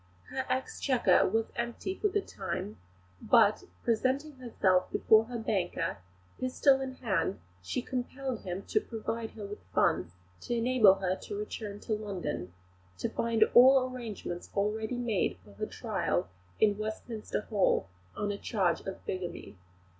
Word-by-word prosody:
Her 265 Hz, 0 st, -2 dB
exchequer 255 Hz, -6 st, +2 dB
was 225 Hz, +3 st, 0 dB
empty 235 Hz, +10 st, -3 dB
for 415 Hz, -, 0 dB
the 410 Hz, 0 st, 0 dB
time; 110 Hz, -, -5 dB, 0.4 s
but, -, -, +4 dB, 0.2 s
presenting 265 Hz, +5 st, 0 dB
herself 195 Hz, -7 st, +1 dB
before 220 Hz, 0 st, +5 dB
her 240 Hz, +1 st, -5 dB
banker, 195 Hz, -, -1 dB, 0.4 s
pistol 265 Hz, +1 st, +3 dB
in 260 Hz, -1 st, -4 dB
hand, 215 Hz, -5 st, -1 dB, 0.2 s
she 165 Hz, -, -3 dB
compelled 255 Hz, -1 st, -3 dB
him 185 Hz, +1 st, -4 dB
to 425 Hz, -, +1 dB
provide 225 Hz, -, -4 dB
her 210 Hz, -2 st, -6 dB
with 205 Hz, +1 st, -8 dB
funds 85 Hz, -, +2 dB, 0.3 s
to 240 Hz, -, -3 dB
enable 230 Hz, -4 st, +6 dB
her 185 Hz, -1 st, -1 dB
to 205 Hz, -, -6 dB
return 210 Hz, 0 st, -5 dB
to 220 Hz, -, -2 dB
London 190 Hz, -, -3 dB, 0.5 s
to -, -, -2 dB
find 230 Hz, -1 st, +2 dB
all 260 Hz, +1 st, +8 dB
arrangements 220 Hz, -8 st, -6 dB
already 220 Hz, +4 st, 0 dB
made 220 Hz, -, 0 dB
for 100 Hz, -, -15 dB
her -, -, -4 dB
trial -, -, -1 dB, 0.3 s
in 205 Hz, -1 st, +3 dB
Westminster 215 Hz, 0 st, -4 dB
Hall 205 Hz, -, +2 dB, 0.3 s
on 205 Hz, 0 st, -1 dB
a 200 Hz, -, -5 dB
charge 185 Hz, -6 st, +1 dB
of 190 Hz, -, -6 dB
bigamy. 185 Hz, -, -5 dB
220 Hz, 145 wpm, -31 LUFS, 195-255 Hz, 0.5 s, all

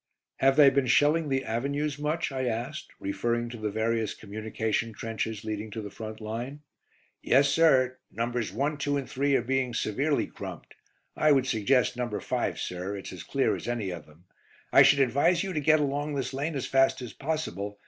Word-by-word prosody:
"Have 135 Hz, 0 st, +4 dB
they 140 Hz, -2 st, +7 dB
been 135 Hz, -1 st, +1 dB
shelling 150 Hz, +4 st, +3 dB
the 135 Hz, 0 st, 0 dB
avenues 140 Hz, +5 st, -2 dB
much?" 150 Hz, +1 st, -1 dB
I 130 Hz, -1 st, -2 dB
asked, 120 Hz, +6 st, -3 dB
referring 120 Hz, +4 st, -1 dB
to 120 Hz, -, -7 dB
the 110 Hz, -1 st, -2 dB
various 110 Hz, 0 st, -1 dB
communication 110 Hz, +2 st, -3 dB
trenches 110 Hz, 0 st, -4 dB
leading 110 Hz, 0 st, -4 dB
to 110 Hz, +1 st, -5 dB
the 105 Hz, -, -7 dB
front 110 Hz, -1 st, -7 dB
line. 120 Hz, +6 st, -5 dB, 0.6 s
"Yes, 140 Hz, +2 st, +4 dB
sir. 130 Hz, -4 st, +3 dB
Nos. 115 Hz, -1 st, -2 dB
1, 140 Hz, +8 st, -1 dB
2 145 Hz, 0 st, 0 dB
and 135 Hz, -3 st, -4 dB
3 140 Hz, +1 st, +1 dB
are 125 Hz, -, +2 dB
being 130 Hz, -1 st, -1 dB
severely 140 Hz, +8 st, 0 dB
crumped. -, -, -9 dB, 0.4 s
I 155 Hz, -, +4 dB
would 135 Hz, -3 st, +4 dB
suggest 125 Hz, +1 st, +2 dB
No. 125 Hz, -1 st, -1 dB
5, -, -, -2 dB
sir; 90 Hz, +3 st, -4 dB
it's 95 Hz, -, -8 dB
as 90 Hz, -, -8 dB
clear 135 Hz, -, 0 dB
as -, -, -7 dB
any 115 Hz, -6 st, -2 dB
of 85 Hz, -3 st, -8 dB
them. 80 Hz, +4 st, -21 dB, 0.5 s
I -, -, +9 dB
should 140 Hz, -, +6 dB
advise 140 Hz, +9 st, +3 dB
you 190 Hz, -1 st, -4 dB
to 155 Hz, -, 0 dB
get 155 Hz, +2 st, +4 dB
along 145 Hz, +1 st, -1 dB
this 135 Hz, -1 st, -3 dB
lane 145 Hz, +4 st, -2 dB
as 135 Hz, -, -2 dB
fast 135 Hz, -1 st, +2 dB
as 120 Hz, -, -7 dB
possible. 120 Hz, -, -3 dB
130 Hz, 190 wpm, -28 LUFS, 110-140 Hz, 0.6 s, I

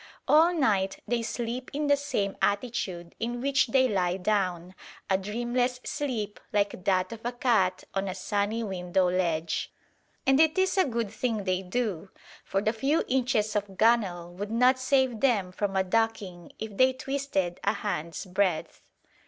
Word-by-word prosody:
All 320 Hz, +3 st, +6 dB
night 205 Hz, -, +1 dB
they 240 Hz, -1 st, 0 dB
sleep 240 Hz, +2 st, -4 dB
in 295 Hz, +1 st, 0 dB
the 285 Hz, 0 st, +5 dB
same 205 Hz, -9 st, -2 dB
attitude 200 Hz, -5 st, -1 dB
in 240 Hz, +1 st, -2 dB
which 275 Hz, +1 st, +2 dB
they 260 Hz, +2 st, +3 dB
lie 185 Hz, -5 st, 0 dB
down, 185 Hz, -3 st, -1 dB, 0.4 s
a -, -, +5 dB
dreamless 240 Hz, +5 st, -1 dB
sleep 240 Hz, -9 st, -3 dB
like 200 Hz, -2 st, 0 dB
that 185 Hz, -1 st, +2 dB
of 230 Hz, -1 st, -8 dB
a 240 Hz, -, -1 dB
cat 235 Hz, -7 st, +1 dB
on 195 Hz, 0 st, -1 dB
a 185 Hz, -, -3 dB
sunny 205 Hz, +3 st, -1 dB
window 185 Hz, -2 st, 0 dB
ledge. 170 Hz, -3 st, -1 dB, 0.5 s
And 270 Hz, +1 st, +4 dB
it 320 Hz, +2 st, +4 dB
is 375 Hz, -1 st, +2 dB
a 380 Hz, -, +4 dB
good 235 Hz, -6 st, -2 dB
thing 220 Hz, -2 st, -2 dB
they 185 Hz, -1 st, 0 dB
do, 195 Hz, -2 st, -3 dB, 0.3 s
for 195 Hz, +1 st, -1 dB
the 215 Hz, -, +1 dB
few 275 Hz, +8 st, +1 dB
inches 240 Hz, -5 st, +1 dB
of 200 Hz, -2 st, -2 dB
gunwale 195 Hz, -7 st, +2 dB
would 200 Hz, +3 st, -5 dB
not 250 Hz, +3 st, +4 dB
save 260 Hz, -3 st, +2 dB
them 210 Hz, -9 st, +2 dB
from 195 Hz, +1 st, -2 dB
a 190 Hz, -, +3 dB
ducking 190 Hz, -4 st, -1 dB
if 220 Hz, -2 st, -6 dB
they 260 Hz, 0 st, +5 dB
twisted 260 Hz, -10 st, -2 dB
a -, -, +2 dB
hand's 165 Hz, +3 st, -4 dB
breadth. 185 Hz, -3 st, -1 dB
215 Hz, 165 wpm, -28 LUFS, 190-250 Hz, 0.5 s, All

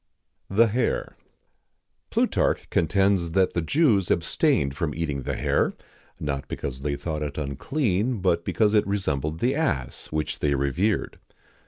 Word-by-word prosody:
SONNINI. 95 Hz, -, -6 dB
THE 115 Hz, +1 st, +7 dB
HARE. 120 Hz, +3 st, -1 dB, 0.9 s
Plutarch -, -, +1 dB
contends 95 Hz, 0 st, +2 dB
that 95 Hz, 0 st, +3 dB
the 85 Hz, -, 0 dB
Jews 105 Hz, -, +2 dB
abstained 85 Hz, -, +1 dB
from 80 Hz, -2 st, -2 dB
eating 75 Hz, -4 st, -2 dB
the -, -, -3 dB
hare, -, -, +1 dB, 0.5 s
not 70 Hz, -2 st, -3 dB
because 65 Hz, -1 st, -5 dB
they 70 Hz, 0 st, -1 dB
thought 75 Hz, +1 st, -4 dB
it 75 Hz, -1 st, -4 dB
unclean, 105 Hz, -, -1 dB
but 90 Hz, -3 st, +1 dB
because 105 Hz, +2 st, +2 dB
it 105 Hz, -2 st, +3 dB
resembled 80 Hz, -6 st, -1 dB
the 125 Hz, +3 st, +2 dB
ass, 140 Hz, -, -2 dB
which 75 Hz, 0 st, -3 dB
they 70 Hz, -1 st, +1 dB
revered. 85 Hz, +10 st, 0 dB
85 Hz, 145 wpm, -25 LUFS, 75-105 Hz, 0.9 s, THE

